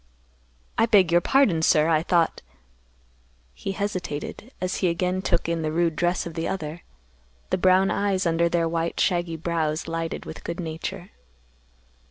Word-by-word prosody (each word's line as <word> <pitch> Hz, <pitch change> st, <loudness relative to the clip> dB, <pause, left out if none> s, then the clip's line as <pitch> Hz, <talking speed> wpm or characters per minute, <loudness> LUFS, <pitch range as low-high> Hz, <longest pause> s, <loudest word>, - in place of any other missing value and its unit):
"I 225 Hz, -, +4 dB
beg 190 Hz, -7 st, +5 dB
your 175 Hz, 0 st, +5 dB
pardon, 215 Hz, -9 st, +3 dB
sir. 155 Hz, -1 st, +4 dB
I 160 Hz, -2 st, +3 dB
thought—" 170 Hz, -1 st, +1 dB, 1.1 s
He 195 Hz, -, -5 dB
hesitated, 200 Hz, -, -4 dB
as 185 Hz, 0 st, -2 dB
he 185 Hz, -, +1 dB
again 180 Hz, +2 st, 0 dB
took 170 Hz, -3 st, 0 dB
in 170 Hz, -1 st, -1 dB
the 155 Hz, -1 st, -1 dB
rude 165 Hz, 0 st, +1 dB
dress 175 Hz, +2 st, 0 dB
of 170 Hz, -, -6 dB
the 165 Hz, 0 st, -2 dB
other. 165 Hz, -2 st, -4 dB, 0.7 s
The -, -, +1 dB
brown 185 Hz, +1 st, +4 dB
eyes, 200 Hz, -2 st, 0 dB
under 170 Hz, 0 st, +2 dB
their 170 Hz, -1 st, +1 dB
white 165 Hz, 0 st, -2 dB
shaggy 175 Hz, -2 st, +1 dB
brows, 160 Hz, -1 st, -1 dB
lighted 165 Hz, 0 st, -3 dB
with 160 Hz, -, -9 dB
good 170 Hz, +1 st, -5 dB
nature. 175 Hz, +3 st, -5 dB
170 Hz, 160 wpm, -25 LUFS, 165-185 Hz, 1.1 s, beg